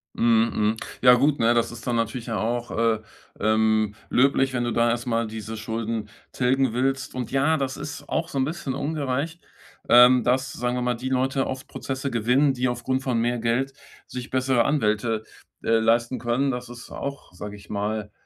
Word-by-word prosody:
Mhm, 115 0 +3 0.2
mhm. - - -12 0.2
Ja, 125 0 +8
gut, 140 +4 +3
ne, 115 +1 +4
das 120 -1 +1
ist 120 -1 -10
dann 120 - 0
natürlich 115 +1 -2
auch, 120 +2 -2
äh, 115 -1 +1 0.4
ähm, 110 0 +2 0.2
löblich, 135 0 +3
wenn 120 - 0
du 120 - -1
da 120 +1 +2
erstmal 115 -1 0
diese 110 0 -6
Schulden 110 -1 -3 0.2
tilgen 130 -1 +1
willst. 135 +2 -1
Und 125 -2 -4
ja, 145 +4 +2
das 135 -2 -2
ist 150 +1 -7
auch 165 +1 -1
so 140 - -2
'n 130 - +2
bisschen 150 -3 -4
ungerecht, 145 +2 -2 0.5
ähm, 125 0 +7
dass, 130 +2 +1
sagen 125 0 -2
wir 125 - -1
mal, 125 0 0
die 125 +3 -4
Leute 130 +1 +1
oft 130 0 -5
Prozesse 135 +1 -4
gewinnen, 125 +4 +2
die 125 0 0
aufgrund 125 +2 -1
von 125 -3 0
mehr 120 +1 +1
Geld 120 +4 0 0.3
sich 125 -1 -7
bessere 130 -2 +2
Anwälte, 110 -5 +1 0.4
äh, - - 0
leisten 115 +2 +2
können. 125 +3 0
Das 125 -1 -5
ist 120 -1 -10
auch, 140 -8 -6
sage 105 +3 -7
ich 100 - -15
mal, 105 0 -3
125 Hz, 185 wpm, -24 LUFS, 115-135 Hz, 0.5 s, Ja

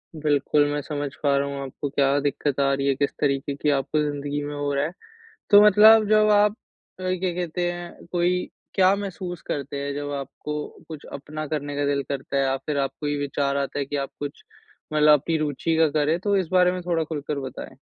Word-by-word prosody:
बिल्कुल, 145 -1 +2
मैं 145 0 -1
समझ 145 -1 -4
पा 140 -1 +3
रहा 140 - 0
हूँ 140 0 -5
आपको 135 +2 -5
क्या 140 0 +2
दिक्कत 145 0 -1
आ 140 0 +3
रही 140 0 -1
है 135 - +2
किस 140 +1 0
तरीके 140 0 0
की 150 - 0
आपको 150 +3 0
ज़िंदगी 145 0 -2
में 145 0 -5
हो 145 0 -2
रहा 140 0 +1
है। 160 - -3 0.6
तो 205 -1 +9
मतलब 215 +1 +7
जब 215 0 +5
आप 210 0 +5 0.5
अ, - - -7
क्या 185 0 -1
कहते 175 0 -2
हैं, 175 0 -9
कोई 180 +1 +1 0.3
क्या 190 +1 +4
महसूस 185 -3 -5
करते 140 0 -3
हैं 140 0 -3
जब 145 0 -4
आपको 145 +2 -5 0.2
कुछ 155 -3 -9
अपना 155 +2 -6
करने 145 -1 -3
का 145 0 0
दिल 140 -1 0
करता 140 0 -3
है? 135 - +3
या 135 0 +1
फ़िर 145 +2 -4
आपको 135 +2 -2
ये 145 - 0
विचार 140 0 -1
आता 140 +1 -2
है 140 - -1
कि 145 - -5
आप 140 -1 -2
कुछ 145 0 -6 0.5
मतलब 150 -1 +6
अपनी 160 +4 -1
रुचि 155 +2 -1
का 160 -1 +5
करें। 155 +3 +2
तो 200 +2 +1
इस 185 - 0
बारे 180 -1 +5
में 180 0 -4
थोड़ा 165 -2 +1
खुलकर 150 -2 -4
बताएँ? 130 -2 -8
145 Hz, 220 wpm, -24 LUFS, 140-175 Hz, 0.6 s, तो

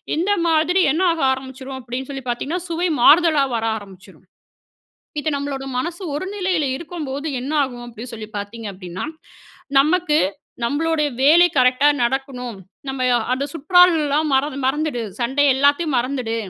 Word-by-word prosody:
இந்த 355 +6 0 0.2
மாதிரி 330 +3 +3
என்ன 320 +5 0
ஆக 330 - -3
ஆரம்பிச்சுரும் 265 0 -6
அப்படின்னு 250 +2 -6
சொல்லி 270 -1 -6
பாத்தீங்கன்னா, 290 +9 -2
சுவை 340 +2 0
மாறுதலா 310 0 +6
வர 225 0 -1
ஆரம்பிச்சுரும். 195 -3 -14 0.9
இது 310 - -1
நம்மளோட 280 -1 -4 0.2
மனசு 345 +7 -4
ஒரு 300 - -3
நிலையில 365 -6 0
இருக்கும்போது 305 -3 -5
என்ன 270 +4 -5
ஆகும், 245 -3 -6
அப்படி 230 0 -9
சொல்லி 220 -1 -7
பாத்தீங்க 215 +2 -6
அப்டின்னா! 185 -1 -7 0.8
நமக்கு, 310 +1 +2 0.5
நம்பளுடைய 300 +4 0
வேலை 330 +6 +6
கரெக்ட்டா 255 +3 +4 0.2
நடக்கணும், 250 -2 -3 0.3
நம்ம 265 -1 -3 0.3
அந்த 260 +2 -2
"சுற்றாலலாம் 315 -3 +3
மறந்து 270 +1 0
மறந்துடு, 290 -2 -1 0.2
சண்டை 265 +4 +1
எல்லாத்தையும் 285 +2 +2
மறந்துடு, 245 -2 -2
280 Hz, 135 wpm, -20 LUFS, 255-320 Hz, 0.9 s, மாறுதலா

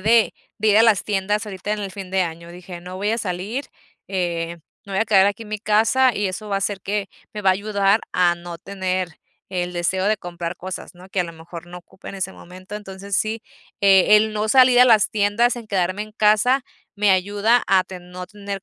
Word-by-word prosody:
de 225 +2 +4 0.2
de 215 +1 +1
ir 210 +1 +5
a - - +7
las 220 -4 +4
tiendas 205 +1 -1
ahorita 205 0 -6
en 215 - -2
el 195 -1 -4
fin 195 -3 -8
de 190 -1 +2
año, 170 0 -6
dije: 175 0 -10
"No 180 +1 -8
voy 205 +3 -1
a 230 - 0
salir, 205 +7 -4 0.4
eh, 170 -3 -2 0.3
me 195 - -6
voy - - +1
a 220 - +3
quedar 195 -3 +5
aquí 205 +3 -2
en 210 - -12
mi 215 - -2
casa, 225 +5 +3
y 205 -1 0
eso 205 +3 -5
va 200 - 0
a - - -2
ser 200 -2 -2
que 200 0 -2 0.3
me 210 - -5
va 190 - +5
a - - +5
ayudar 200 +1 +1
a 175 -1 +3
no 175 0 -8
tener 185 -3 -3 0.3
el 180 -1 -2
deseo 185 +3 0
de 215 0 +2
comprar 175 -2 -6
cosas, 185 0 -7
¿no?, 180 +2 -15
que 190 - 0
a - - +1
lo 170 - -8
mejor 165 +1 -10
no 175 0 -10
ocupe 180 - -14
en - - -7
ese 190 0 -3
momento". 185 +3 -12
Entonces 200 -1 -6
sí, 220 +3 0 0.4
eh, 195 +1 +6
el 215 0 +2
no 215 +1 -2
salir 250 0 +6
a 250 - +8
las 220 -4 +5
tiendas, 220 +4 +2
en 230 -2 -8
quedarme 185 -1 -1
en 215 0 -11
casa 215 +5 +3 0.3
me 205 -1 +3
ayuda 205 +5 +2
a 190 -1 +4
ten 180 -1 -11
no 180 0 -7
tener 200 -1 -7
195 Hz, 235 wpm, -22 LUFS, 180-215 Hz, 0.4 s, a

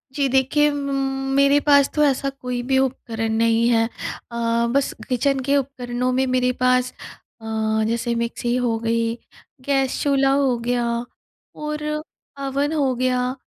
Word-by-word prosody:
जी 280 -2 +1
देखिए 270 +3 +3
म 285 -1 -3 0.4
मेरे 280 +1 +5
पास 285 -1 +6
तो 300 - +3
ऐसा 275 -1 +1
कोई 250 -2 -5
भी 265 - +3
उपकरण 230 -4 -1
नहीं 230 +1 +2
है। 225 -1 +3 0.5
अ, - - -7 0.4
बस 280 0 +1 0.2
किचन 270 +2 +1
के 280 +2 +2
उपकरणों 250 -2 -2
में 260 +1 +2
मेरे 255 0 +2
पास 255 0 +3 0.5
अ, - - -11 0.4
जैसे 235 +1 -1
मिक्सी 235 +1 -2
हो 245 -3 0
गई, 230 0 0 0.5
गैस 270 -2 0
चूल्हा 275 -1 +3
हो 275 -3 +2
गया 245 -1 +1 0.8
और 300 0 -3 0.6
अवन 280 +3 -1
हो 280 -4 +1
गया, 250 0 0
255 Hz, 145 wpm, -22 LUFS, 240-275 Hz, 0.8 s, पास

